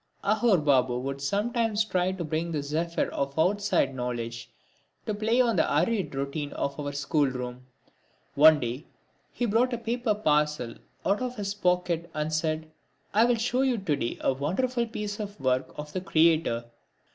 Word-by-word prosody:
Aghore 215 0 +3
Babu 130 -3 +3
would 135 +2 -4
sometimes 215 - 0
try 185 -3 0
to 190 -2 -4
bring 160 +2 -2
the 150 -3 -2
zephyr 165 +4 -1
of 140 +1 -3
outside 185 -4 +2
knowledge 120 -2 -4 0.6
to 215 - -1
play 220 +4 +1
on 235 -3 +3
the - - +2
arid 180 +3 +1
routine 140 +2 -3
of 140 +1 -3
our 145 -1 -3
schoolroom. 130 -4 -1 0.7
One 155 +1 +7
day 125 +4 -4 0.4
he 245 - -2
brought 235 +3 +2
a - - 0
paper 235 -1 -1
parcel 150 - +1 0.3
out 200 +4 +2
of 250 -1 -3
his 200 -3 -3
pocket 180 -3 0
and 155 +1 -2
said: 155 0 -1 0.4
"I'll 235 +3 +4
show 245 +3 0
you 260 -3 +2
to 190 -8 0
day 120 - -3
a - - +2
wonderful 235 - -1
piece 210 -2 -5
of 205 -4 -6
work 130 -1 0
of 150 0 -7
the 185 - -2
Creator." 160 -9 +2
165 Hz, 165 wpm, -27 LUFS, 140-210 Hz, 0.7 s, One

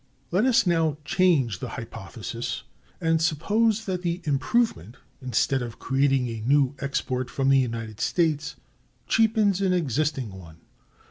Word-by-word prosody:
Let 190 +7 +2
us 255 -5 +4
now 165 -4 +1
change 155 - +2
the - - -5
hypothesis, - - -6 0.4
and 165 -1 +1
suppose 210 +8 +1
that 185 -2 -2
the 175 0 -1
improvement, 140 - 0 0.2
instead 130 +1 +1
of 120 -2 -6
creating 135 -1 +1
a 115 -2 -5
new 135 +2 +3
export 130 -3 -2
from 135 +1 0
the 135 0 +5
United 115 -4 -3
States, 155 -4 0 0.5
cheapens 215 -3 +3
an 190 -2 +2
existing 145 - -1
one. 85 -4 -12
145 Hz, 135 wpm, -25 LUFS, 125-180 Hz, 0.5 s, the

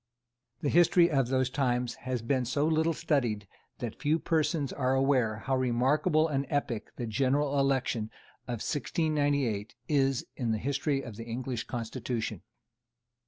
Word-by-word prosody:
The 145 - 0
history 175 +1 +5
of 135 -4 +2
those 130 0 +1
times 125 -3 0 0.2
has 125 -3 -1
been 130 +2 +1
so 140 +5 +1
little 160 +1 +2
studied 115 - 0 0.3
that - - -6
few 150 +2 +2
persons 155 -3 0
are 130 -1 +1
aware 130 -5 +2
how 130 - +1
remarkable 135 +6 +2
an 140 -3 -1
epoch 120 -7 -2
the 120 - -4
general 140 +5 +1
election 130 -5 +1 0.4
of 120 -3 -4
1698 145 -8 0
is 135 -3 +2
in 120 -4 -1
the - - 0
history 140 +3 -1
of 110 -4 -8
the 115 - -7
English 120 +1 -4
Constitution. 115 -3 -4
135 Hz, 145 wpm, -30 LUFS, 120-145 Hz, 0.4 s, history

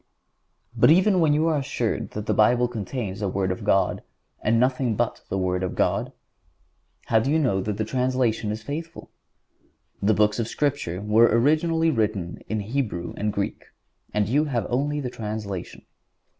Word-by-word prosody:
But - - +5
even 185 +4 +5
when 160 -3 +4
you 155 +2 +2
are 155 -3 +2
assured 130 -5 -2
that 105 0 -4
the - - +1
Bible 120 +3 +4
contains 110 -3 -5
the 105 - -1
Word 95 0 -1
of 90 - -5
God, 95 -2 +2 0.4
and 115 +2 +2
nothing 125 -2 +1
but 120 0 -1
the 95 - -1
Word 90 -1 0
of 95 - -3
God, - - 0 0.9
how 110 - +3
do 115 - -1
you 155 - +3
know 120 -11 +1
that 105 +1 -3
the 110 - -1
translation 125 -3 0
is 110 +1 -5
faithful? 160 +6 -7 0.9
The 105 +2 +3
Books 105 +1 +2
of 115 - -1
Scripture 130 - -2
were 110 +3 +5
originally 155 +7 +2
written 105 - -2
in 110 -1 -1
Hebrew 105 -7 -3
and 105 0 -1
Greek, 100 -1 -3 0.5
and 105 -1 0
you 145 +7 +2
have 125 -6 -1
only 145 +4 0
the 125 -3 -4
translation. 105 -5 -6
115 Hz, 170 wpm, -24 LUFS, 105-140 Hz, 0.9 s, But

